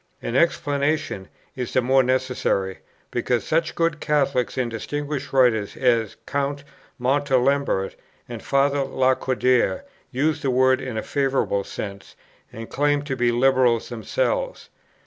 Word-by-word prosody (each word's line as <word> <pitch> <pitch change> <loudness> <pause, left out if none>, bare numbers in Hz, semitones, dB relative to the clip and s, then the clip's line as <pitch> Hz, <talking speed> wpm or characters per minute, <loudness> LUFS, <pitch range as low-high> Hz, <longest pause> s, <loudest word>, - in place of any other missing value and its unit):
An 115 - -4
explanation 145 - 0 0.3
is 125 -2 -4
the 130 - +3
more 135 +2 +4
necessary, 125 -7 0 0.3
because 120 -1 0
such 165 +1 0
good 165 -2 0
Catholics 140 -6 0
and 125 -2 -1
distinguished 145 +4 -4
writers 120 -6 +2
as 115 -5 +1
Count 140 0 -2 0.4
Montalembert 135 -4 +1 0.3
and 120 -2 -7
Father 140 +1 +2
Lacordaire 130 -5 +1 0.3
use 150 +5 0
the 135 - 0
word 130 +1 +3
in 130 -4 -5
a - - -2
favorable 135 -7 0
sense, 100 0 -7 0.4
and 115 +1 -8
claim 145 0 +1
to 140 -2 -3
be 120 -1 +2
Liberals 125 -1 +3
themselves. - - -2
130 Hz, 125 wpm, -23 LUFS, 120-140 Hz, 0.4 s, more